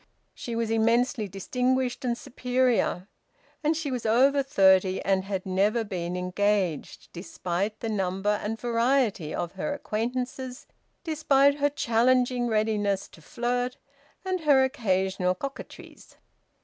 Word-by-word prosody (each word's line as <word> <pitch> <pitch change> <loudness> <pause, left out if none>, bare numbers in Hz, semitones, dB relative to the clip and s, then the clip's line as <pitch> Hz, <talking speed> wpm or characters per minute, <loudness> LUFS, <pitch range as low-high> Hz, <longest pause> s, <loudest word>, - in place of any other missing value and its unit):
She 235 - -6
was 230 -1 -1
immensely 230 +1 +2
distinguished 250 +7 -1
and 240 -2 -1
superior. 250 -7 0 0.6
And 310 +1 +1
she 310 -4 -3
was 250 -2 -3
over 265 +6 +4
thirty 190 -7 +3
and 190 -1 +1
had 195 -2 -3
never 200 +5 +1
been 180 -4 -4
engaged, 180 -2 -1
despite 185 +3 -4
the 230 - -3
number 195 0 -1
and 225 +2 -4
variety 235 - +1
of 170 +1 -3
her 285 +10 -3
acquaintances, 250 +3 -4 0.4
despite 290 -3 +3
her 290 +1 +3
challenging 245 -1 +2
readiness 215 -3 0
to 165 - -17
flirt, 245 +7 -2 0.5
and 370 -1 -1
her 290 -5 +4
occasional 190 -8 0
coquetries. 275 +8 -9
230 Hz, 125 wpm, -26 LUFS, 195-255 Hz, 0.6 s, over